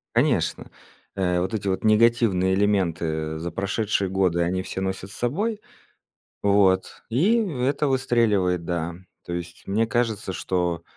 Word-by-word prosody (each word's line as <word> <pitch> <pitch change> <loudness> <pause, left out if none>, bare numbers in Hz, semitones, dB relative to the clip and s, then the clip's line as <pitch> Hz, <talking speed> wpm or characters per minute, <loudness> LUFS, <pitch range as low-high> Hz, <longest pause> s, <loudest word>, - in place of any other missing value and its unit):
Конечно, - - +1 0.4
э, 90 -2 +1
вот 95 +3 -2
эти 100 -2 -2
вот 95 -1 -1
негативные 110 -4 +3
элементы 85 -6 0
за 85 +2 -4
прошедшие 100 +2 -1
годы 90 -2 +1
они 90 +2 0
все 95 - -5
носят 95 +1 -4
с - - -8
собой, 205 - -1 0.8
вот, 100 -2 +2
и 175 - +3
это 145 - 0
выстреливает. 110 -9 +1
Да, 85 0 -2 0.3
то - - -6
есть 85 0 -6
мне 110 +3 +1
кажется, 110 -4 -1
что 90 -2 -1
95 Hz, 135 wpm, -24 LUFS, 90-115 Hz, 0.8 s, негативные